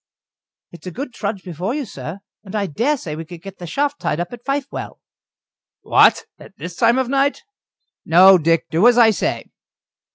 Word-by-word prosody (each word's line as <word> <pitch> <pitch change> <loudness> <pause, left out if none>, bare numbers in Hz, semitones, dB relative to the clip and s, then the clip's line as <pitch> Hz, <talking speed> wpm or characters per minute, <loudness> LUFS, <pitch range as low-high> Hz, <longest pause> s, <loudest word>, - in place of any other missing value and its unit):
"It's 170 +2 -12
a - - -5
good 255 - -6
trudge 200 -3 -4
before 180 - -4
you, 295 -2 -3
sir. 160 - -8 0.2
And 195 0 -9
I 205 -1 0
dare 235 - 0
say 155 - -6
we 160 - -6
could 170 0 -12
get 195 -1 -10
the 175 - -7
shaft 285 - -2
tied 150 - -1
up 175 +6 -4
at 240 0 -10
Fifewell." 275 +1 -4 0.8
"What - - +4
at - - -15
this 170 +3 -8
time 235 +5 +3
of 260 -1 0
night? 275 +2 0 0.6
No, 185 +3 +7
Dick, 165 +1 +1
do 170 +9 +4
as 245 -1 +5
I 230 -2 +6
say." 210 - -2
195 Hz, 190 wpm, -19 LUFS, 170-250 Hz, 0.8 s, No